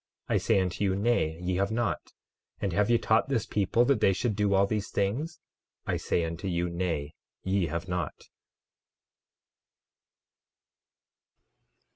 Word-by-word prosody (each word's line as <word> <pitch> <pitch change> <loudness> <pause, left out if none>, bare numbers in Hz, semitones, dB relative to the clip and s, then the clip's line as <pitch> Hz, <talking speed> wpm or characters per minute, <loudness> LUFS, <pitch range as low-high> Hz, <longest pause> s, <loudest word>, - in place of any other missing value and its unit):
I - - +2
say - - +2
unto 95 +1 -1
you, 95 -2 +2
Nay, 100 -7 +1
ye 90 0 -1
have 100 +1 +1
not. 115 -1 -2 0.5
And 100 -3 -1
have 105 +4 +2
ye 120 - +5
taught 110 +3 +2
this 115 -6 0
people 105 +4 +2
that 135 -3 +3
they 95 - +5
should 110 +2 -1
do 100 -1 +2
all 95 +1 +5
these 105 0 -2
things? 135 - -1 0.5
I - - 0
say 85 - 0
unto 85 +3 -4
you, 85 -1 -1
Nay, 85 -4 -2 0.3
ye 95 -2 +1
have 85 +3 -4
not. 90 -4 -2
95 Hz, 145 wpm, -29 LUFS, 90-110 Hz, 0.5 s, ye